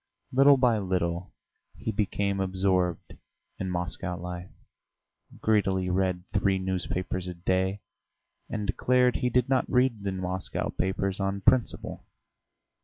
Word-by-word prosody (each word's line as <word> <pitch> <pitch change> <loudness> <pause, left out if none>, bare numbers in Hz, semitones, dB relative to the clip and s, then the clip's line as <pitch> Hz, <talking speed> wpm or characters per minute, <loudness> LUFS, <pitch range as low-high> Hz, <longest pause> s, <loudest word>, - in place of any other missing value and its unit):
Little 135 +2 +6
by 120 -4 +3
little 90 -2 -1 0.4
he - - -3
became 100 -1 0
absorbed 95 -2 0 0.5
in 95 - -2
Moscow 90 0 -3
life, 90 +1 -6 0.9
greedily 95 -4 +2
read 90 -1 0
three 100 -2 +2
newspapers 95 -1 -2
a 90 - -5
day, 95 +3 0 0.7
and 105 -1 -3
declared 125 +4 +2
he 125 - 0
did 125 +1 +2
not 130 -1 +1
read 125 -4 +2
the 100 -1 -2
Moscow 95 0 -3
papers 95 +1 -1
on 100 0 -1
principle! 125 +4 +1
95 Hz, 120 wpm, -28 LUFS, 90-105 Hz, 0.9 s, Little